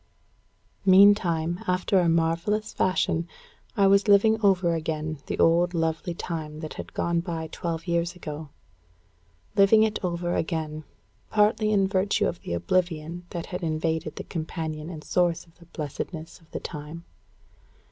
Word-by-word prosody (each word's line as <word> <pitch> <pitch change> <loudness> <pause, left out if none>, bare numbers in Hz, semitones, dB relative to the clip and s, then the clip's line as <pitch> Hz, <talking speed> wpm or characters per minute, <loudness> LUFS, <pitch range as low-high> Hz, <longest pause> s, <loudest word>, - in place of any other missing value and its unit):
Meantime, 185 -4 +5
after 185 +1 +2
a 175 -2 +3
marvellous 170 +7 0
fashion, 175 -2 +1 0.5
I 200 - +5
was 200 +1 +4
living 220 +2 +5
over 185 -4 +3
again 155 -1 -3
the - - -3
old 175 +2 +3
lovely 165 +1 -1
time 155 -3 -5
that 155 - -6
had - - -9
gone 170 0 +1
by 165 -2 -4
twelve 165 -1 -4
years 170 0 0
ago; 155 -3 -7 1.1
living 210 +2 +6
it 215 -1 -1
over 175 -1 -1
again, 155 -2 -2 0.4
partly 215 0 +3
in 195 -2 +3
virtue 200 +2 +1
of 170 - -3
the - - -5
oblivion 170 - -1
that 170 -2 -5
had 180 - -5
invaded 160 -1 -2
the - - -6
companion 160 -1 -5
and 160 -3 -8
source 175 0 +1
of 165 0 -26
the 170 - -16
blessedness 160 +2 -6
of 165 -2 -24
the - - -5
time. 155 +2 -8
170 Hz, 145 wpm, -26 LUFS, 160-185 Hz, 1.1 s, living